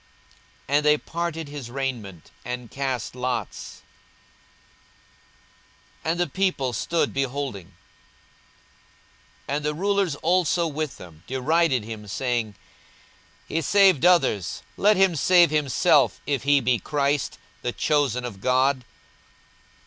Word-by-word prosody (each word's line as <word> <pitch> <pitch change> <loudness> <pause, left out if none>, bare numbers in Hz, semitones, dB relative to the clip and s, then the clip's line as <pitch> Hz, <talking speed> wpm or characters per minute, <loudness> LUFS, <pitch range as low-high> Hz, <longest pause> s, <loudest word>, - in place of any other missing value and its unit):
And 145 +2 +2
they 150 0 +4
parted 165 -1 -4
his 140 -4 -8
raiment, 120 - -5
and 125 -1 -6
cast 130 -4 -3
lots. 125 0 -4 2.2
42:023:035 160 - 0
And 170 - -2
the 175 - +1
people 180 -10 -1
stood 165 +9 -1
beholding. 130 -9 -4 1.7
And 145 +2 -2
the 150 0 -1
rulers 195 -2 0
also 175 +1 +1
with 155 -2 -3
them 85 -3 -13
derided 135 0 +1
him, 110 -1 -8
saying, 115 -1 -2 0.9
He 165 - -1
saved 190 0 +4
others; 135 - +2
let 210 0 +3
him 190 -3 +4
save 175 +2 +5
himself, 145 - +3
if 140 -4 -1
he 145 -1 +4
be 120 -1 +1
Christ, 145 +2 -1 0.2
the 125 - -2
chosen 135 -4 0
of 100 -5 -8
God. 130 +1 +2
140 Hz, 115 wpm, -24 LUFS, 125-165 Hz, 2.2 s, save